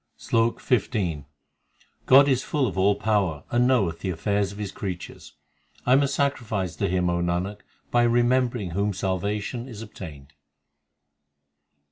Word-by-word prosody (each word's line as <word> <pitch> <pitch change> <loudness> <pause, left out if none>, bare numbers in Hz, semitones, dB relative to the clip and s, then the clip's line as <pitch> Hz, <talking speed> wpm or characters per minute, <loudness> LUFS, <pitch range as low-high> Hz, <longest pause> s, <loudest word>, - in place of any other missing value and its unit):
SLOK 115 +1 +1
XV 95 - -1 0.8
God 140 +2 +8
is 130 -2 +2
full 145 -4 0
of 100 -8 -3
all 100 +2 +3
power 100 -8 0
and 120 +1 +3
knoweth 100 -11 +1
the 95 - -3
affairs 100 +3 0
l - - -9
of - - -12
His 105 -2 -4
creatures; 95 -4 -7 0.5
I 125 - +4
am 135 - +6
a 140 - +2
sacrifice 120 - -1
to 100 - 0
Him, 90 0 +1
O 85 0 0
Nanak, 90 +4 -2 0.3
by 120 - +4
remembering 120 -3 +2
whom 100 +4 0
salvation 100 +6 -2
is 115 -4 -8
obtained. 75 -10 -10
105 Hz, 150 wpm, -25 LUFS, 90-120 Hz, 0.8 s, God